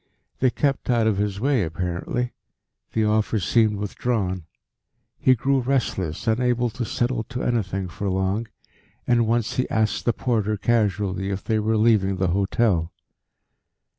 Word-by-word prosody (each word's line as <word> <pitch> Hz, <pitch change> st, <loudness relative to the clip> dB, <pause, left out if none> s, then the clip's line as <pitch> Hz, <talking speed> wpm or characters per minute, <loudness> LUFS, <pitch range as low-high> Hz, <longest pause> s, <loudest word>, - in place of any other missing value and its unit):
They 130 Hz, -, +4 dB
kept 140 Hz, +2 st, -1 dB
out 120 Hz, -2 st, +3 dB
of 110 Hz, -3 st, +2 dB
his 100 Hz, -1 st, -1 dB
way 135 Hz, 0 st, +2 dB
apparently; 90 Hz, +8 st, -2 dB, 0.6 s
the 110 Hz, -1 st, +2 dB
offer 110 Hz, +1 st, +1 dB
seemed 110 Hz, +1 st, +2 dB
withdrawn; 100 Hz, -3 st, -2 dB, 0.7 s
he 130 Hz, -, +5 dB
grew 135 Hz, +3 st, +1 dB
restless, 120 Hz, -, -1 dB
unable 120 Hz, +1 st, +1 dB
to 120 Hz, -, -4 dB
settle 120 Hz, 0 st, -1 dB
to 125 Hz, +1 st, -5 dB
anything 95 Hz, -5 st, -1 dB
for 95 Hz, +4 st, -4 dB
long, 95 Hz, +4 st, 0 dB, 0.6 s
and 120 Hz, -2 st, +3 dB
once 115 Hz, -1 st, 0 dB
he 130 Hz, -, 0 dB
asked 110 Hz, -1 st, 0 dB
the 120 Hz, -, +4 dB
porter 110 Hz, -4 st, 0 dB
casually 100 Hz, -4 st, 0 dB
if 95 Hz, 0 st, -3 dB
they 110 Hz, -1 st, +1 dB
were 110 Hz, +1 st, +1 dB
leaving 105 Hz, -3 st, +3 dB
the 95 Hz, -1 st, 0 dB
hotel. 95 Hz, -2 st, +1 dB
110 Hz, 145 wpm, -24 LUFS, 95-120 Hz, 0.7 s, he